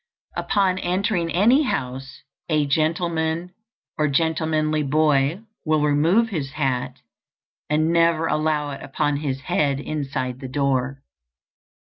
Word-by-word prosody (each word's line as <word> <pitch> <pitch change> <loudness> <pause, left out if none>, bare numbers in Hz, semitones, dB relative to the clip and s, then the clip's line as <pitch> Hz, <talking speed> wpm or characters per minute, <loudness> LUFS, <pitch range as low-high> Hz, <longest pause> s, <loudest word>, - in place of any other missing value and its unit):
Upon 190 -2 +1
entering 180 -2 0
any 235 - +4
house 135 - -4 0.3
a 155 -2 +2
gentleman 160 +3 0 0.5
or 150 - +3
gentlemanly 155 +1 +1
boy 150 +3 +2 0.2
will 155 -3 +1
remove 165 +10 +3
his 145 -9 -4
hat, 135 -4 -2 0.7
and 155 +2 +2
never 165 -1 +3
allow 155 -2 0
it 140 - -7
upon 145 +1 -1
his 135 -2 -3
head 140 0 0
inside 135 -4 -3
the 135 - -6
door. 135 0 -1
155 Hz, 115 wpm, -23 LUFS, 140-165 Hz, 0.7 s, any